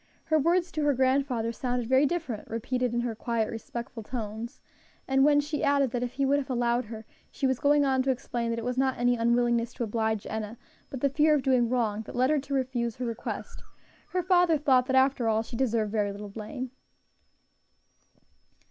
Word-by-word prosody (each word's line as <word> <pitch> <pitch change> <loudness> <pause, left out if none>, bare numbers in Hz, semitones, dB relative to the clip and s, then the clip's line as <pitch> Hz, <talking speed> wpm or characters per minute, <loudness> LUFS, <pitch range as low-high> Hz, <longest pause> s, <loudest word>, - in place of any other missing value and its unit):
Her 315 0 +2
words 345 +4 +2
to 310 - -2
her 290 -2 +2
grandfather 260 -3 +1
sounded 245 0 -2
very 260 +3 +4
different, 275 -10 -4
repeated 250 +2 -1
in 240 0 0
her 240 -1 -2
quiet, 225 0 -2
respectful 235 +1 -6
tones; 225 +1 -6 0.5
and 270 0 +3
when 290 0 +5
she 295 +1 -2
added 280 -3 +3
that 245 -1 -2
if 245 0 -3
he 275 +1 0
would 280 +1 +3
have 275 -1 -6
allowed 240 -1 +1
her, 220 0 -9 0.2
she 275 - -3
was 260 -2 +1
going 290 0 +4
on 265 -1 +2
to 265 - -1
explain 240 -2 -2
that 230 - -1
it 230 - -4
was 250 +1 -1
not 265 -1 +1
any 245 0 +2
unwillingness 235 0 +1
to 245 - -2
oblige 220 -1 -1
Enna, 220 +1 -5 0.3
but 265 - -7
the 280 - +4
fear 305 +2 +3
of 280 - -1
doing 250 -3 +3
wrong, 225 -4 0
that - - -8
led 255 +3 +3
her 305 - +3
to 280 +1 -6
refuse 245 -3 -1
her 250 - -4
request, 230 -1 -5 0.5
her 365 -1 -1
father 355 -3 +4
thought 260 -3 +3
that 260 - +1
after 265 -2 +3
all 220 0 +2
she 230 - -9
deserved 230 -4 0
very 210 -2 0
little 205 +1 -8
blame. 225 +5 -6
250 Hz, 205 wpm, -28 LUFS, 230-275 Hz, 0.5 s, when